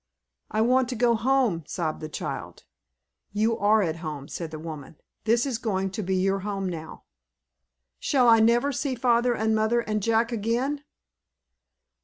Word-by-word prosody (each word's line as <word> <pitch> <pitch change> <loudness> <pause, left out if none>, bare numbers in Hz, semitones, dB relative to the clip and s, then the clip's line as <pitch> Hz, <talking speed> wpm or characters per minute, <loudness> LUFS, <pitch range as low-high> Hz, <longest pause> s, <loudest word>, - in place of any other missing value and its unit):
"I 215 - 0
want 250 +2 +3
to 255 - -3
go 240 +1 +3
home," 230 -7 +1
sobbed 160 -4 -3
the 155 - -5
child. - - -6 0.7
"You 220 +2 +2
are 210 +1 +4
at 165 -2 -2
home," 150 -4 -6
said 165 -2 -5
the 155 - -7
woman. 155 -1 -8 0.3
"This 230 +2 +3
is 255 -5 -2
going 195 -5 -1
to 215 - -4
be 190 -1 -1
your 195 +1 +1
home 195 -1 -3
now." 160 -3 -7 1.0
"Shall 255 -4 +2
I 225 -1 +7
never 235 +5 +3
see 270 0 -2
father 240 0 +2
and 220 0 +1
mother 220 +2 +2
and 215 -2 -2
Jack, 230 +2 +2
again?" 240 +6 -1
220 Hz, 165 wpm, -26 LUFS, 190-240 Hz, 1.0 s, I